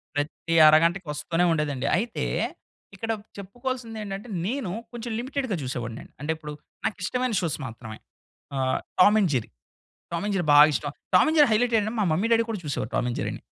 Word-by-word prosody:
ప్రతి 150 +3 -2
అరగంటకి 170 +4 +4
వస్తూనే 165 +4 0
ఉండేదండి. 145 -4 -1
అయితే 230 +5 -2 0.7
ఇక్కడ 225 +3 -3 0.3
చెప్పుకోవాల్సిందేంటంటే 225 -1 -5 0.2
నేను 245 -5 -2 0.2
కొంచెం 240 0 -5
లిమిటెడ్‌గా 260 -3 -2
చూసేవాడిని 120 -3 -4
అండి. - - -19
అంటే 150 +2 -1
ఇప్పుడు 150 -1 -8 0.3
నాకు 200 - -1
ఇష్టమైన 250 +2 -1
షోస్ 165 -5 -1
మాత్రమే 110 -1 -9 0.6
ఆహ్, 130 0 +1 0.2
Tom 210 +4 +7
and 185 - +2
Jerry, 120 -4 -1 0.6
Tom 170 +3 -2
and 205 - -1
Jerry 175 -4 -1
బా 145 - +7 0.2
ఇష్టం. 145 0 -2 0.2
టామ్ 180 - +7
అండ్ 315 - +1
జెర్రీ 295 -4 +7
హైలైటెంటంటే 225 -1 +2
మా 205 - +3
మమ్మీ 190 +8 +1
డ్యాడీ 230 0 +4
కూడా 215 -4 -3
చూసేవాళ్ళు 135 -7 -3
టామ్ 120 - +1
అండ్ 120 - -3
జెర్రీ‌ని. - - -4
185 Hz, 175 wpm, -26 LUFS, 150-225 Hz, 0.7 s, టామ్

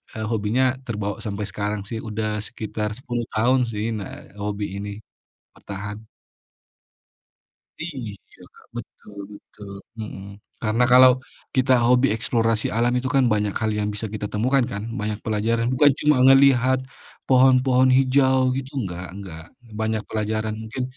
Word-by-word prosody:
eee, 110 0 -3
hobinya 110 +3 +1 0.2
terbawa 105 -4 -3
sampai 105 0 -3
sekarang 105 +1 -3
sih, 115 - -4
udah 110 0 -2 0.2
sekitar 110 -2 -4
10 120 -2 -4
tahun 120 +4 +3
sih, 105 0 -3
nah 100 - -6 0.3
hobi 105 0 -2
ini 100 +1 -5 0.7
bertahan. 105 +1 -7 1.8
Iya, 130 - -8
Kak, - - -20
betul 105 - -10 0.2
betul. 100 0 -12 0.3
Mhm. 105 -3 -7 0.4
Karena 115 +2 +2
kalau 130 +1 +9 0.4
kita 130 0 +3
hobi 125 +2 +4
eksplorasi 115 -1 +1
alam 120 +1 +2
itu 130 +1 -2
kan, 135 -1 +4
banyak 105 -1 0
hal 110 - 0
yang 105 0 0
bisa 105 +2 -3
kita 105 -1 -3
temukan, 125 +6 +2
kan? 100 0 -4 0.2
Banyak 105 0 -2
pelajaran. 115 +2 0
Bukan 145 +3 +6
cuma 150 -1 +4
ngelihat 130 -1 +5 0.5
pohon-pohon 130 0 +5
hijau 130 0 +3
gitu, 135 0 -5
enggak 90 -4 -5
enggak. 90 -5 -9 0.4
Banyak 110 -1 -1
pelajaran 110 0 -2
mungkin 120 +4 -5
110 Hz, 135 wpm, -23 LUFS, 105-130 Hz, 1.8 s, kalau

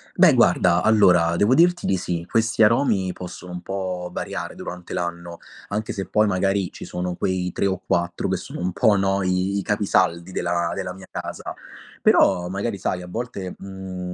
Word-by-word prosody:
Beh, - - +6
guarda, 85 -1 +4
allora 90 -6 +4
devo 105 +8 +4
dirti 175 +2 +3
di 95 - +2
sì. 85 -1 -3
Questi 115 -1 +1
aromi 105 -4 +3
possono 90 0 -9
un 90 0 -6
po' 90 -2 -4
variare - - -4
durante 90 0 -8
l'anno, 85 -1 -4 0.3
anche 105 +2 -2
se 100 -3 -4
poi, 105 +4 +2
magari, 95 -1 0
ci - - -9
sono 90 0 -3
quei 90 0 -1
3 - - -1
o 95 -1 -1
4 85 0 -1
che - - 0
sono - - -8
un 90 +1 -2
po', 105 +3 +4
no, 95 0 +1
i 90 +2 0
i 100 - -1
capisaldi 95 -4 +1
della 85 -1 -1
della 95 -2 -4
mia 95 0 -13
casa. - - -6 0.4
Però, 90 0 +4
magari, 100 +3 -3
sai, 90 -1 -2
a 90 - -9
volte, 100 -2 -5
mhmm, 95 -2 -7
95 Hz, 185 wpm, -23 LUFS, 90-100 Hz, 0.4 s, Beh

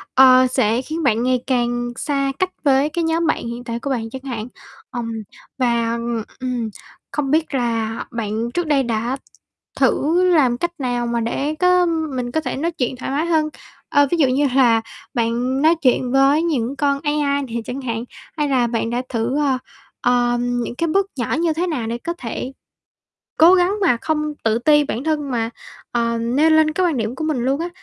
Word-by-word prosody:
ờ, 255 -1 +7
sẽ 230 0 +1
khiến 320 +4 -4
bạn 235 -3 +2
ngày 255 -1 +1
càng 240 -1 0
xa 275 -1 -1
cách 370 - +1
với 280 +1 +3
cái 335 +2 -2
nhóm 325 0 +1
bạn 235 - 0
hiện 235 +1 -6
tại 235 -1 -4
của 280 - -4
bạn 225 -4 -2
chẳng 260 +2 -7
hạn. 235 -4 -4 0.4
Ờm, 235 -2 -4 0.5
và 235 -2 +1
ừm, 235 -1 -2 0.2
ừm, 250 -3 -2 0.4
không 280 -3 -2
biết 315 0 +1
là 230 -3 -1
bạn 230 0 -3
trước 350 +1 -1
đây 285 -3 +3
đã 235 +2 -1 0.6
thử 335 +5 +3
làm 280 -9 +3
cách 345 +4 -1
nào 245 -2 -1
mà 235 0 0
để 275 +6 -2
có 360 0 +4 0.3
mình 245 -1 -3
có 315 - 0
thể - - -3
nói 330 +4 -1
chuyện 260 -6 -2
thoải 255 +1 -5
mái 300 +4 0
hơn? 315 -2 +1 0.4
Ờ, 285 0 +4
ví 345 - +2
dụ 285 -5 +4
như 275 +3 +2
là 235 -4 +5 0.3
bạn 240 +3 0
nói 320 +3 +5
chuyện 255 -1 +2
với 275 +3 +4
những 275 -6 -1
con 280 0 +1
AI 295 -2 +1
nè 255 -5 -7
chẳng 265 +2 -5
hạn, 230 -2 -3 0.3
hay 295 -1 +1
là 250 -3 +2
bạn 230 -1 -1
đã 240 +1 -1
thử, 235 +3 -1
ờ, 275 -3 +2 0.4
ờm, 245 0 +1
những 235 - -5
cái 335 - -1
bước 390 +4 +2
nhỏ 235 - -1
như 335 -1 +1
thế 345 +3 -1
nào 265 -10 -2
để 230 +1 -2
có 340 +8 -4
thể 250 +2 -5 0.9
cố 335 +4 +8
gắng 365 +1 +3
mà 335 -10 +4
không 305 -1 -1
tự 225 0 +2
ti 295 +4 +4
bản 260 -1 -4
thân 300 -3 -1
mà, 230 -2 -1 0.4
ờ, 235 -1 0
nêu 255 +8 +2
lên 315 0 +4
cái 365 +3 +1
quan 325 -5 0
điểm 225 0 -2
của 315 - -4
mình 310 -4 0
luôn 265 +5 0
á. 340 - -2
260 Hz, 205 wpm, -20 LUFS, 235-305 Hz, 0.9 s, cố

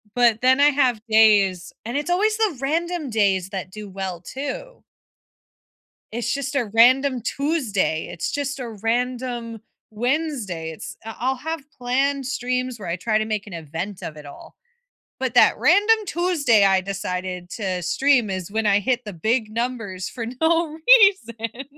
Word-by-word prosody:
But 235 -3 +3
then 260 +2 +4
I 290 +1 +6
have 260 -6 +2
days 205 -5 +4
and 235 - -4
it's 295 +4 -2
always 425 +5 +2
the 425 -10 0
random 330 +1 -1
days 195 -4 +1
that 190 -2 -5
do 210 +2 -9
well 190 -2 -5
too. - - -7 1.3
It's 235 +2 -2
just 280 +1 -4
a 260 -4 +1
random 255 +2 +4
Tuesday, 250 - -1
it's 170 - -4
just 280 -1 -3
a 245 -2 -5
random 240 -1 -2 0.3
Wednesday. 235 - -2
It's 160 - -9
I'll 225 - -7
I'll 260 +2 0
have 320 +3 -5 0.2
planned 270 +2 0
streams 250 -1 -2
where 190 - -7
I 170 - -1
try 215 +4 0
to 215 - -1
make 215 -2 -3
an 195 - -9
event 170 +5 -6
of 155 -4 -7
it 150 - -11
all, 140 - -12 0.6
but 260 -2 -2
that 245 - +5
random 410 +7 +5
Tuesday 310 - +2
I 195 -1 +4
decided 185 -2 -4
to 185 -4 -3
stream 245 - +2
is 185 -1 -4
when 220 +1 -1
I 200 -1 +4
hit 245 +4 -1
the 210 - -7
big 220 +6 -1
numbers 225 -5 -3
for 235 -3 -6 0.2
no 320 -1 +1
reason. 270 - +4
235 Hz, 165 wpm, -22 LUFS, 200-280 Hz, 1.3 s, I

